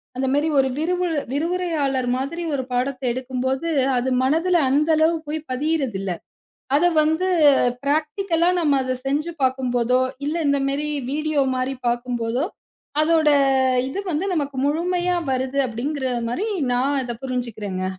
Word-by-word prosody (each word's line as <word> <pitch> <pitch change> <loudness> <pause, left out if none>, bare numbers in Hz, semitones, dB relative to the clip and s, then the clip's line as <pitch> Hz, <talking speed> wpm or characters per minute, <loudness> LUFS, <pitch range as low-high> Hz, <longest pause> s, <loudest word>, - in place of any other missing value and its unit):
அந்த 265 +1 -1
மாரி 290 +3 +2
ஒரு 265 0 +2
விரிவு 360 +3 0 0.2
விரிவுரையாளர் 300 -4 -1
மாதிரி 300 +7 -4
ஒரு 270 -2 -1
பாடத்தை 255 +1 -1
எடுக்கும்போது, 260 +3 -2 0.3
அது 250 +2 0
மனதில 325 +7 +2
அந்த 295 +4 +2
அளவு 320 +2 +3
போய் 310 +2 -2
பதியறது 275 -4 0
இல்ல. 195 -1 -3 0.7
அத 305 - +2 0.2
வந்து 320 +4 +1 0.6
பராக்டீக்கல்லா 325 +4 +1
நம்ம 290 -4 +3
அதச் 255 0 -3
செஞ்சு 300 +5 -1
பாக்கும்போதோ 255 -1 +1 0.3
இல்ல 305 +3 -1
இந்த 280 0 +3
மேரி 290 +2 -1 0.2
வீடியோ 305 0 0
மாரி 255 +1 -1
பாக்கும் 240 +1 -1
போதோ 230 +5 -1 0.6
அதோட 315 0 +3 0.6
இது 270 - -5
வந்து 320 +3 -1
நமக்கு 285 -4 -2
முழுமையா 355 +4 0
வருது 260 +1 -1
அப்டிங்கற 260 +4 -3 0.2
மாரி 375 - -2 0.3
நான் 260 +4 +1
அத 240 -2 -4
புரிஞ்சுக்கறேன்ங்க. 220 -7 -3
280 Hz, 135 wpm, -22 LUFS, 255-315 Hz, 0.7 s, அளவு